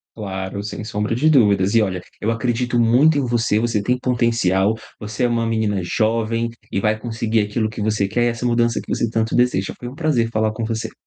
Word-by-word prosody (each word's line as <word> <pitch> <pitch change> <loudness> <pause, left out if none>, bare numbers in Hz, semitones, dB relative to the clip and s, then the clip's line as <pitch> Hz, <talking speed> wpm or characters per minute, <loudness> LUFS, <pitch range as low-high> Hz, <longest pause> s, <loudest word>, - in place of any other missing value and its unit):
Claro, 95 -2 -5
sem 105 +1 -6
sombra 105 +1 -2
de 150 +6 +2
dúvidas 100 -9 +4
e 115 - +5
olha, 95 -3 -1 0.2
eu 110 - 0
acredito 120 +1 0
muito 130 +7 +4
em - - +2
você, 120 -4 +1
você 115 -3 0
tem 125 +5 0
potencial, 115 -5 +1 0.2
você 105 +3 -4
é - - +4
uma 115 -1 0
menina 110 -3 0
jovem, 115 +4 0 0.2
e 100 - 0
vai 110 +1 0
conseguir 115 -1 -1
aquilo 105 +2 -1
que 110 -1 -6
você 105 -2 0
quer 120 +4 0
e - - +3
essa 115 +1 -3
mudança 120 -1 +2
que - - -5
você 115 - 0
tanto 115 0 -1
deseja. 120 -6 +1
Foi 120 - -7
um 130 - -8
prazer 145 -8 +1
falar 110 -1 0
com 115 - -4
você. 115 0 -4
115 Hz, 215 wpm, -20 LUFS, 105-120 Hz, 0.2 s, e